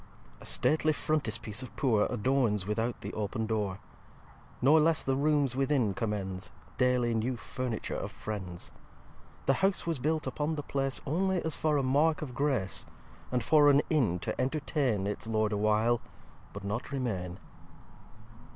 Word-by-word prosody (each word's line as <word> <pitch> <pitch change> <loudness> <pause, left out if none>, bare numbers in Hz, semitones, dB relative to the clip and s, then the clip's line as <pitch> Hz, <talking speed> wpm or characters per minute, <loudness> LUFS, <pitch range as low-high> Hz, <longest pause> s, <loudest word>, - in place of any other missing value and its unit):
ix - - -6
A - - +2
Stately 155 0 +3
Frontispice 115 -8 -1
Of 130 - -9
Poor 115 -7 +2
Adorns 120 -4 +1
without 115 +3 -2
the - - -6
open 110 +1 -2
Door: 105 -4 -1 0.8
Nor 145 +5 +6
less 160 0 +3
the 135 - +1
Rooms 145 -2 +2
within 135 -6 +2
commends 95 -2 -3 0.3
Daily 125 -2 +3
new 120 +3 -1
Furniture 125 -1 -3
Of - - -4
Friends. 95 -5 -6 0.7
The 135 - +4
House 195 -1 +2
was 165 -5 -1
built 155 +4 0
upon 155 +2 -1
the 145 - -4
Place 135 -1 -1
Only 185 +5 +1
as 160 - +1
for 155 -2 +1
a 140 - +1
Mark 150 +4 +2
Of 130 -5 -6
Grace; 130 -9 0 0.5
And 125 -2 0
for 150 +1 +6
an 145 +1 +5
Inn 125 - +2
to - - -2
entertain 135 - 0
Its 105 +2 -4
Lord 110 -1 +1
a 105 - 0
while, 110 +3 +2 0.5
but 100 - -8
not 105 +7 -3
remain. 95 -10 -2
125 Hz, 160 wpm, -30 LUFS, 105-145 Hz, 0.8 s, Nor